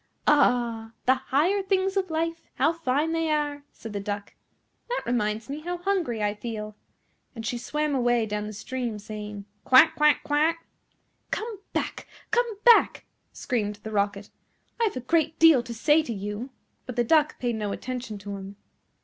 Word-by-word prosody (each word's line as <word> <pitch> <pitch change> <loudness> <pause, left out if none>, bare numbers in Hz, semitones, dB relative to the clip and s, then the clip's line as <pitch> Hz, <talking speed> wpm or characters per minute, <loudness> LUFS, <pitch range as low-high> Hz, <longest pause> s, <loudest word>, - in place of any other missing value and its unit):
"Ah! 240 -6 +2
the 260 - +6
higher 295 +9 +1
things 385 0 0
of 380 -2 0
life, 330 +1 -1
how 325 - +3
fine 310 -1 0
they 325 -1 0
are!" 290 -1 -1
said 225 -2 -9
the 200 - -2
Duck; 205 0 -5 0.5
"and - - -44
that - - -2
reminds 220 -2 -1
me 280 +2 -5
how 350 +3 -4
hungry 350 - -1
I 205 0 +1
feel:" 215 -1 -6 0.6
and 225 -1 -6
she 240 +2 -2
swam 300 +4 -1
away 240 -3 +2
down 210 0 -3
the - - -5
stream, 235 +1 -4
saying, 210 -1 -7 0.2
"Quack, 260 +5 +7
quack, 300 0 +4
quack." 320 +3 +1 0.6
"Come 440 -3 -4
back! - - -3 0.2
come 480 +2 +3 0.2
back!" 475 -1 +6 0.3
screamed 210 -5 -2
the 220 - -6
Rocket, 200 -1 -1 0.5
"I 460 - +3
have 415 - -1
a - - -3
great 320 +4 +1
deal 320 -6 +7
to 240 - -9
say 295 +7 +3
to 270 -7 -4
you;" 210 +5 -5 0.4
but 250 - -5
the 240 - +2
Duck 300 +4 +3
paid 240 -2 -1
no 210 -2 -2
attention 245 -2 -5
to 200 0 -6
him. 195 +1 -9
255 Hz, 175 wpm, -26 LUFS, 215-320 Hz, 0.6 s, Quack